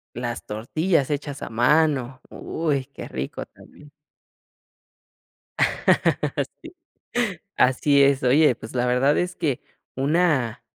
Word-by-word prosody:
Las 120 0 -4
tortillas 145 - -1
hechas 145 -1 -4
a - - -5
mano, 130 +1 +2
uy, 145 -5 -2
qué 140 - -10
rico 65 +1 -5
también. 150 -1 -18 2.7
Sí, - - -10 0.8
así 140 +2 +4
es. 140 -1 +3
Oye, 135 +1 +4
pues, 115 +2 -11
la 125 0 +1
verdad 125 +4 +2
es 180 0 -1
que 150 -8 -1 0.3
una, 140 -5 +1
140 Hz, 105 wpm, -23 LUFS, 125-150 Hz, 2.7 s, así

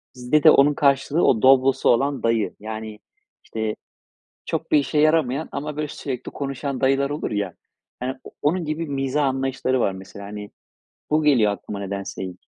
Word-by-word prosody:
Bizde 125 +5 +1
de 155 - +9
onun 145 +1 +5
karşılığı 140 +3 +2
o 110 -5 +3
Doblo'su 135 0 +4
olan 135 +3 +2
dayı. 115 -2 +1
Yani 110 0 -7 0.4
işte, 110 -1 -3 0.7
çok - - -3
bir - - +6
işe 150 +1 -1
yaramayan 155 -2 +2
ama 150 +1 -4
böyle 150 -1 -2
sürekli 130 -3 -6
konuşan 140 -1 -4
dayılar 135 +1 +2
olur 145 -4 -3
ya 100 -4 -2 0.5
yani 130 +1 -2
o - - -11
onun 170 +3 +1
gibi 155 +2 -2
mizah 140 +1 0
anlayışları 130 -1 0
var 100 - +2
mesela 95 +1 -10
hani 105 0 -8 0.6
bu 155 +1 +3
geliyor 120 -8 +4
aklıma 100 0 -7
nedense 100 -1 -5
ilk. 90 -1 -10
135 Hz, 165 wpm, -23 LUFS, 110-145 Hz, 0.7 s, de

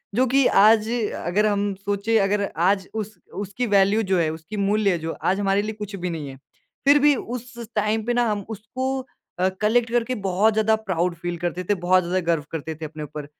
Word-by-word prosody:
जो 255 +3 +4
कि 270 +2 +3
आज 215 +2 +5
अ, 235 -3 -2
अगर 200 +5 +2
हम 205 -1 +1
सोचे 200 +3 0
अगर 200 0 +1
आज 190 +3 +2
उस 215 -1 -5 0.2
उसकी 205 +5 -3
वैल्यू 200 +3 +4
जो 190 -2 +1
है, 160 -2 +2
उसकी 160 +7 -7
मूल्य 200 -2 +2
जो 165 0 -4
आज 190 +2 +1
हमारे 195 0 +2
लिए 215 +1 -4
कुछ 210 -1 -5
भी 180 -1 -3
नहीं 160 -4 -5
है। 135 - -10 0.5
फिर 285 +1 +6
भी 290 0 +5
उस 250 +1 -6
स 235 - -7
टाइम 215 +1 +1
पे 240 - 0
ना 240 0 +2
हम 205 -2 -3
उसको 255 +5 -3 0.4
अ, 185 +1 +3
कलेक्ट 230 +2 +2
करके 240 +1 0
बहुत 195 +4 +3
ज़्यादा 220 +1 +3
प्राउड 180 -5 -1
फ़ील 175 0 -4
करते 175 +2 -3
थे, 205 - +1
बहुत 185 0 +2
ज़्यादा 180 +2 0
गर्व 160 -3 0
करते 160 0 -4
थे 160 +1 -7
अपने 155 0 -7
ऊपर। 150 0 -7
205 Hz, 220 wpm, -23 LUFS, 180-220 Hz, 0.5 s, फिर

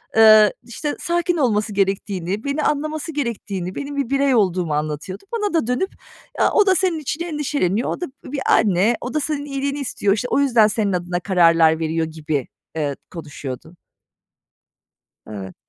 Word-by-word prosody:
eee, 215 -1 +7
işte, 290 +5 -4
sakin 345 0 0
olması 215 -6 +1
gerektiğini, 195 0 -1
beni 280 +2 -1
anlaması 310 +2 -1
gerektiğini, 205 - -4
benim 285 0 -5
bir 275 -4 -1
birey 275 -1 +2
olduğumu 180 -6 +1
anlatıyordu. 155 +5 -4
Bana 415 -5 -1
da 320 -9 +1
dönüp 250 +11 -1 0.5
"Ya, - - +3
o 420 - +4
da 380 -1 +4
senin 350 -2 +1
için 305 +3 -3
endişeleniyor. 285 - -1
O - - -4
da 355 - 0
b 260 0 -14
bir 280 -2 -3
anne. 205 +3 +3
O 250 - -5
da 305 - +1
senin 290 -1 -2
iyiliğini 280 0 -3
istiyor. 205 -6 0
İşte, 220 +4 -2
o - - +3
yüzden 240 -6 +4
senin 210 -2 0
adına 175 0 -2
kararlar 165 -3 +4
veriyor" 160 0 -1
gibi, 155 -4 -3 0.3
eee, 145 -3 -1 0.2
konuşuyordu. 150 -1 -8 1.5
Evet. 95 -3 -8
220 Hz, 165 wpm, -21 LUFS, 175-285 Hz, 1.5 s, eee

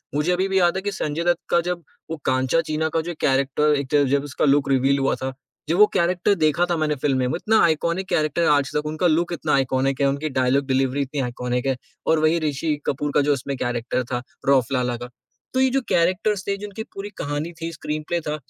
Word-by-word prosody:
मुझे 150 +4 +1
अभी 185 +2 +1
भी 190 0 +2
याद 175 -1 +3
है - - -2
कि 205 - -1
संजय 160 -4 -3
दत्त 175 0 +2
का 170 - +4
जब 175 -1 -3 0.3
वो 165 - -3
कांचा 130 +5 +2
चीना 160 0 -1
का 165 - +3
जो 175 +2 -5
कैरेक्टर 140 +2 +2
एक 140 -2 -5
तरह 145 -1 +4
जब 140 0 +2
उसका 145 0 -1
लुक 140 -1 +3
रिवील 135 +1 +3
हुआ 135 - +1
था, 130 0 -4 0.4
जब 170 - +2
वो 210 - +8
कैरेक्टर 180 +3 +2
देखा 155 0 +2
था - - +2
मैंने 155 -1 0
फ़िल्म 135 -1 0
में, 125 - +1
उतना 220 0 +2
आइकॉनिक 170 +3 0
कैरेक्टर 155 +2 +1
है - - +3
आज 145 -2 +2
तक, 150 0 0
उनका 155 +3 0
लुक 170 +2 +1
इतना 155 -2 -1
आइकॉनिक 135 0 +1
है, 140 - +4
उनकी 140 +3 -2
डायलॉग 130 +1 +1
डिलीवरी 135 +1 +1
इतनी 140 +1 -3
आइकॉनिक 125 0 -2
है 135 - +1 0.3
और 160 - +4
वही 155 +2 +3
ऋषि 155 0 -1
कपूर 145 +2 -1
का - - +5
जो 145 +1 +2
उसमें 140 +1 -4
कैरेक्टर 120 +1 -2
था 120 -1 -1 0.3
रफ 130 -3 +4
लाला 125 -1 0
का। 120 +1 -8 0.4
तो 260 - +1
ये 265 - +4
जो 270 +1 +1
कैरेक्टर्स 185 +4 +1
थे 200 0 0
जिनकी 205 +1 -6
पूरी 195 +1 -5
कहानी 145 +3 -3
थी, 165 0 -3
स्क्रीनप्ले 155 +1 -3
था, 150 -1 -3
150 Hz, 235 wpm, -23 LUFS, 135-170 Hz, 0.4 s, वो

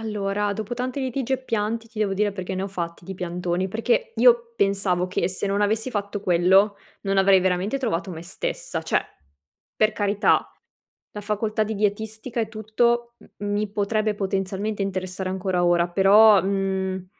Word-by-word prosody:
Allora 205 -1 -1
dopo 220 +3 -4
tanti 255 +3 -3
litigi 260 0 -2
e 260 - -7
pianti, 225 0 -2
ti 220 -1 -11
devo 200 -2 +1
dire 205 +1 +1
perché 190 -1 -5
ne 185 - -2
ho 195 - -3
fatti 170 -3 -5
di 190 - -6
piantoni, 180 +1 -2
perché 465 - 0
io 475 -1 +4
pensavo 195 - +1
che 180 -1 -1
se 190 +2 -2
non 200 +1 0
avessi 220 +4 0
fatto 205 -2 -3
quello 190 +3 +4 0.3
non 195 0 -1
avrei 195 0 +5
veramente 185 +7 0
trovato 200 -8 -2
me 165 -1 -7
stessa. 175 - -4
Cioè, - - +1 0.8
per 215 0 +3
carità, 205 0 +1 0.6
la 210 - -6
facoltà 215 +1 -1
di 220 +1 -3
dietistica 220 +3 -2
e 220 - -1
tutto 235 +2 0
m 205 - -10
mi 205 0 -1
potrebbe 215 +1 0
potenzialmente 195 +1 -2
interessare 185 -1 -3
ancora 185 -1 0
ora 175 0 +3
però, 200 +2 +6
mhmm, 190 -1 -1
200 Hz, 165 wpm, -24 LUFS, 190-220 Hz, 0.8 s, però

